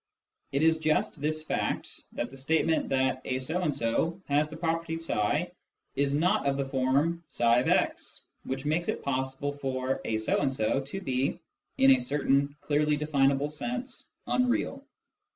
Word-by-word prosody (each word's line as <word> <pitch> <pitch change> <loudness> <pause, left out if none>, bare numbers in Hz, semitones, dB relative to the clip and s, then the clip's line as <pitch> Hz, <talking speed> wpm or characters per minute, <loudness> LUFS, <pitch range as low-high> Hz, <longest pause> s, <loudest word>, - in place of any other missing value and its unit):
It 140 +3 +1
is 160 0 +4
just 155 -1 0
this 155 +1 0
fact, - - -3
that 120 - -3
the - - -11
statement 160 +4 +1
that 130 -1 +1
a 130 - -1
so 155 +8 0
and 165 -4 +1
so 145 +7 0
has 145 +2 +2
the 160 - -8
property 165 0 -1
tfi 165 -11 0 0.4
is 140 0 +1
not 180 +3 +2
of 135 0 +1
the 140 - 0
form 135 +6 +1
ifix, 120 +1 +1 0.2
which 135 +1 -4
makes 160 +4 0
it - - -2
possible 135 +1 -2
for 135 -2 -2
" - - -15
a 110 - 0
so 110 - +1
and 140 -2 +1
so 130 +1 +1
" - - -14
to 195 +7 -5
be, 130 -4 0 0.4
in 135 0 +7
a 130 - +6
certain 140 +2 +1
clearly 150 0 +1
definable 140 -1 +2
sense, 245 - -4
" - - -49
unreal." 250 +2 0
145 Hz, 170 wpm, -29 LUFS, 130-160 Hz, 0.4 s, in